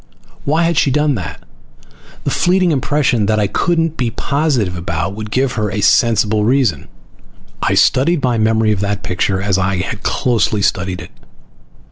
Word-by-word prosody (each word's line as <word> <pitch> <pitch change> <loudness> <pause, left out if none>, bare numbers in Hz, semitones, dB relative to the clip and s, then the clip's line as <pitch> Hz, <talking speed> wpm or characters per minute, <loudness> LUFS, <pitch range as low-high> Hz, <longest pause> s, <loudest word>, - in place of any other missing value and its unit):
Why 155 +4 +1
had 170 -2 +2
she - - +2
done 150 +2 +1
that? 85 - -6 0.8
The - - -1
fleeting 180 0 +2
impression 135 -6 +1
that 110 0 +1
I 105 - +2
couldn't 165 - 0
be 125 -3 0
positive 135 - -1
about 85 +1 -3
would 105 +1 -7
give 130 +3 0
her 105 -3 -2
a 105 +1 -3
sensible 110 0 +3
reason. 115 - +1 0.7
I - - +1
studied 145 +4 +2
my 120 -3 +1
memory 110 0 +2
of 105 - -1
that 100 0 -2
picture 95 +2 -1
as 100 -2 +1
I 95 +1 0
had 100 +3 -4
closely 110 -4 0
studied 95 -2 -1
it. - - -11
110 Hz, 165 wpm, -16 LUFS, 100-140 Hz, 0.8 s, sensible